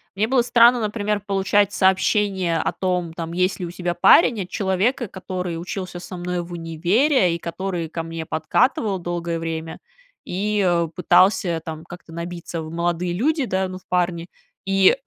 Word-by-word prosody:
мне 210 Hz, +3 st, +1 dB
было 255 Hz, +1 st, +3 dB
странно, 240 Hz, 0 st, +5 dB
например, 210 Hz, -1 st, -1 dB
получать 200 Hz, 0 st, +2 dB
сообщения 190 Hz, -2 st, +2 dB
о -, -, 0 dB
том, 180 Hz, -3 st, -2 dB
там, 165 Hz, 0 st, -5 dB
есть 185 Hz, +3 st, 0 dB
ли 180 Hz, -, -3 dB
у 170 Hz, -, -6 dB
тебя 175 Hz, -1 st, -2 dB
парень, 215 Hz, -, +5 dB
от 180 Hz, -, -6 dB
человека, 205 Hz, +6 st, 0 dB
который 185 Hz, -2 st, -5 dB
учился 180 Hz, 0 st, -5 dB
со 180 Hz, +1 st, -8 dB
мной 175 Hz, 0 st, -3 dB
в 175 Hz, +1 st, -10 dB
универе 175 Hz, -, +1 dB
и -, -, -6 dB
который 175 Hz, 0 st, -4 dB
ко 165 Hz, +1 st, -4 dB
мне 165 Hz, 0 st, -6 dB
подкатывал 195 Hz, -, +1 dB
долгое 170 Hz, -1 st, -3 dB
время 165 Hz, 0 st, -5 dB, 0.5 s
и, 205 Hz, +3 st, -1 dB
э, 170 Hz, -1 st, +2 dB
пытался 180 Hz, -1 st, +3 dB
там 160 Hz, 0 st, -7 dB
как-то 175 Hz, -1 st, -12 dB
набиться 170 Hz, 0 st, -6 dB
в 155 Hz, 0 st, -8 dB
молодые 175 Hz, +1 st, -1 dB
люди, 285 Hz, -, +1 dB
да, 190 Hz, -3 st, -1 dB
ну, 185 Hz, 0 st, -7 dB
в 185 Hz, -, -19 dB
парни. 175 Hz, -1 st, 0 dB, 0.4 s
И 195 Hz, +4 st, +4 dB
180 Hz, 170 wpm, -22 LUFS, 170-200 Hz, 0.5 s, странно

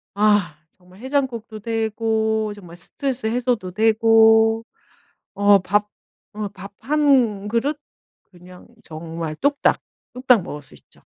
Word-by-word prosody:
아 205 Hz, -7 st, +2 dB
정말 180 Hz, +2 st, -21 dB
해장국도 255 Hz, -5 st, -3 dB
되고 220 Hz, -1 st, -1 dB
정말 175 Hz, -4 st, -13 dB
스트레스 260 Hz, +6 st, -4 dB
해소도 235 Hz, -4 st, -1 dB
되고 225 Hz, +1 st, +4 dB, 0.7 s
어 205 Hz, 0 st, +5 dB
밥, 205 Hz, +3 st, 0 dB, 0.4 s
어 210 Hz, -1 st, -4 dB
밥 200 Hz, 0 st, -12 dB
1 260 Hz, -9 st, +1 dB
그릇 270 Hz, +7 st, -1 dB, 0.5 s
그냥 180 Hz, 0 st, -16 dB, 0.2 s
정말 160 Hz, -1 st, -7 dB
뚝딱, 285 Hz, -, +1 dB, 0.3 s
뚝딱 250 Hz, -3 st, +3 dB
먹을 150 Hz, -4 st, -8 dB
수 -, -, -16 dB
있죠. -, -, -20 dB
220 Hz, 210 characters per minute, -21 LUFS, 195-235 Hz, 0.7 s, 어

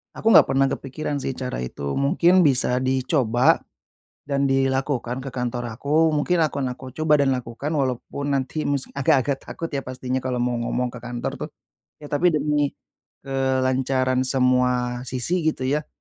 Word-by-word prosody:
Aku -, -, -4 dB
nggak -, -, +8 dB
pernah 135 Hz, 0 st, +3 dB
kepikiran 145 Hz, +3 st, -4 dB
sih -, -, -1 dB
cara 125 Hz, -, -4 dB
itu. 70 Hz, +2 st, -4 dB
Mungkin 175 Hz, +6 st, +4 dB
bisa 125 Hz, -3 st, +2 dB
dicoba, 130 Hz, -2 st, +2 dB, 0.6 s
dan 140 Hz, -1 st, 0 dB
dilakukan 135 Hz, -1 st, 0 dB
ke 135 Hz, -, -6 dB
kantor 125 Hz, -2 st, -3 dB
aku. 150 Hz, +6 st, +2 dB
Mungkin 170 Hz, +4 st, +1 dB
akan 140 Hz, -5 st, 0 dB
aku 130 Hz, +1 st, -10 dB
coba 150 Hz, -2 st, +3 dB
dan 140 Hz, -, +3 dB
lakukan 120 Hz, +3 st, -5 dB
walaupun 140 Hz, -1 st, -2 dB
nanti 140 Hz, +3 st, -1 dB
mis 140 Hz, -2 st, -1 dB
agak-agak 140 Hz, -1 st, +2 dB
takut 165 Hz, -, -5 dB
ya 140 Hz, -3 st, -4 dB
pastinya 130 Hz, 0 st, -4 dB
kalau 125 Hz, -1 st, -1 dB
mau 120 Hz, 0 st, 0 dB
ngomong 125 Hz, +1 st, -1 dB
ke 125 Hz, -, -10 dB
kantor 120 Hz, 0 st, -5 dB
tuh. -, -, -6 dB, 0.6 s
Ya 145 Hz, -, -10 dB
tapi 165 Hz, +3 st, +3 dB
demi, 150 Hz, -1 st, 0 dB, 0.5 s
kelancaran 130 Hz, -1 st, 0 dB
semua 125 Hz, -1 st, +1 dB
sisi 130 Hz, +9 st, -1 dB
gitu 155 Hz, -4 st, -1 dB
ya. 145 Hz, +4 st, -1 dB
135 Hz, 155 wpm, -23 LUFS, 125-145 Hz, 0.6 s, nggak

